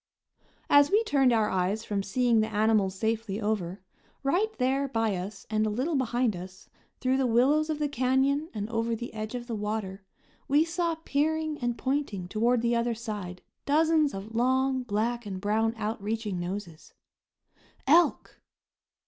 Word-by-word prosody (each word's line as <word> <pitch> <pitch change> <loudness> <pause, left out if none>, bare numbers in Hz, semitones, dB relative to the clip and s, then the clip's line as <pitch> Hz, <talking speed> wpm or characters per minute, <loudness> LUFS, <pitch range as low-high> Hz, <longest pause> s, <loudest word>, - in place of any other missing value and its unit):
As 285 0 +6
we 425 +5 +3
turned 275 - +3
our 220 -2 +3
eyes 190 +4 0
from 205 -2 -1
seeing 235 +3 +2
the 215 - +2
animals 210 -2 +2
safely 220 -1 -2
over, 205 -4 -2 0.4
right 365 +11 +1
there 270 +2 +1
by 225 -5 0
us 195 +2 -6
and 215 0 0
a 215 - +1
little 255 +10 -1
behind 245 -4 +1
us, 185 +1 -10 0.3
through 260 0 +1
the 265 -1 +2
willows 275 +7 +3
of 310 - -1
the 300 -1 0
canyon 275 +3 +1
and 210 -2 -4
over 230 0 0
the 235 +1 -7
edge 215 +2 -5
of 240 -1 -5
the 240 - -5
water, 210 -2 -3 0.4
we 295 +3 +4
saw 335 0 -1
peering 310 +1 0
and 240 -1 -2
pointing 260 -10 -2
toward 230 +4 +1
the 235 0 +2
other 235 0 0
side 210 -6 -6 0.2
dozens 310 -1 +3
of 200 +3 -7
long 260 +2 +2
black 235 0 -2
and 190 -2 -5
brown 220 +3 0
outreaching 215 -2 -3
noses. 175 -2 -6 0.9
Elk! 330 +5 +3
230 Hz, 160 wpm, -28 LUFS, 210-270 Hz, 0.9 s, As